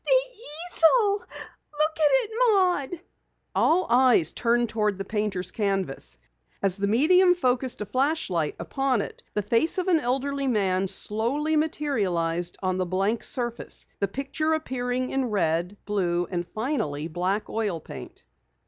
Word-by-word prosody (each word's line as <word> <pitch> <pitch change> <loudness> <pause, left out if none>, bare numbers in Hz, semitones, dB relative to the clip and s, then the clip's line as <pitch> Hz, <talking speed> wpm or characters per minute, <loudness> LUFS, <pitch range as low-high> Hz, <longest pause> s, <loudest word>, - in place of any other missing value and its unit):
"The - - +2
easel! 360 +2 +3
Look - - -22 0.5
at 310 0 +2
it, - - +2
Maud!" 365 - +2 0.5
All 355 +3 +3
eyes 240 - +4
turned 240 0 +1
toward 210 -2 0
the 195 - -5
painter's 200 -4 -2
canvas. 195 - -1 0.5
As 195 -2 +3
the 200 0 -1
medium 355 - +4
focused 255 -7 0
a - - -2
flashlight 255 - 0
upon 270 -5 0
it, - - -8
the 210 - 0
face 235 - +2
of 370 0 -1
an 335 -3 +4
elderly 275 +2 -1
man 195 -5 +1
slowly 250 +12 +1
materialized 185 - -1
on 185 0 0
the 185 - 0
blank 195 +5 0
surface, 240 -2 -1
the 200 - +1
picture 275 - -2
appearing 255 -4 -3
in 270 -1 0
red, 180 -3 -1
blue 175 -4 0
and 175 -1 -3
finally 175 - -3
black 180 +5 -2
oil 210 -7 -2
paint. - - -11
240 Hz, 140 wpm, -25 LUFS, 195-300 Hz, 0.5 s, eyes